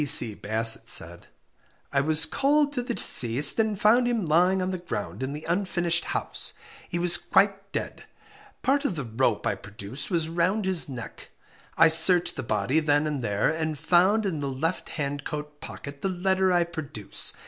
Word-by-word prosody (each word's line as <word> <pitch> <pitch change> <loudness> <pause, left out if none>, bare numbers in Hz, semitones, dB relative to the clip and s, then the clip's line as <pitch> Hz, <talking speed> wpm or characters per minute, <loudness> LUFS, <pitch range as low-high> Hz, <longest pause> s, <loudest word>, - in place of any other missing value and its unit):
P.C. 130 -6 +7
Bassett 110 +2 +2
said - - +2 0.7
I 140 - +2
was 155 +2 +5
called 285 - 0
to 250 - -2
the 240 -1 -5
deceased, 125 - +5
and 215 -3 -1
found 235 +4 +3
him 230 -6 -1
lying 180 +5 +2
on 185 0 -2
the 185 - -5
ground 105 - -6
in 130 +1 -4
the 150 +2 -8
unfinished 175 -1 -1
house. - - -4 0.3
He 175 - -3
was 175 0 +2
quite 195 +2 0
dead. - - -6 0.6
Part 280 +2 +1
of 205 - -2
the 145 -4 -5
rope 115 -1 -1
I - - 0
produce 100 +6 -7
was 165 -3 0
round 180 +5 -1
his 185 -5 +1
neck. 125 -4 -10 0.5
I - - +6
searched 165 +2 +3
the - - -5
body 110 +7 -1
then 145 -1 +1
and 145 -4 -4
there, 105 -1 0
and 160 -1 -4
found 190 +8 +2
in 175 -6 -3
the 140 -1 -4
left 160 +7 -4
hand 145 -2 -5
coat 150 -1 -7
pocket 140 0 -10
the 195 - -2
letter 190 +1 0
I 175 -1 +2
produce. 155 - -3
165 Hz, 180 wpm, -25 LUFS, 140-190 Hz, 0.7 s, P.C